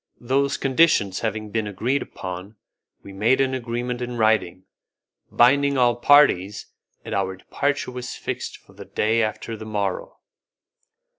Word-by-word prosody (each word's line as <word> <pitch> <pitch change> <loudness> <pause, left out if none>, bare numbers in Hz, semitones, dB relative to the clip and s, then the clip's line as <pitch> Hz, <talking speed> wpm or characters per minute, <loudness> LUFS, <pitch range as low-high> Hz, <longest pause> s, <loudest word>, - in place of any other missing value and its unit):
Those 135 +3 0
conditions 130 - +2
having 110 -2 -3
been 110 -1 -1
agreed 120 +8 -1
upon, 90 +3 -7 0.5
we 100 - -11
made 115 +7 +2
an 135 -1 +1
agreement 120 0 -3
in 125 0 -4
writing, 110 -5 +1 0.7
binding 140 +3 +4
upon 130 -2 +3
all 120 -1 +3
parties, 120 -8 +4 0.4
and - - -5
our 95 -1 -1
departure 140 +8 -2
was 125 0 -6
fixed - - -5
for - - -22
the - - -11
day 110 +2 +1
after 110 +1 -3
the 110 - -9
morrow. 100 -3 -3
115 Hz, 145 wpm, -23 LUFS, 105-130 Hz, 0.7 s, binding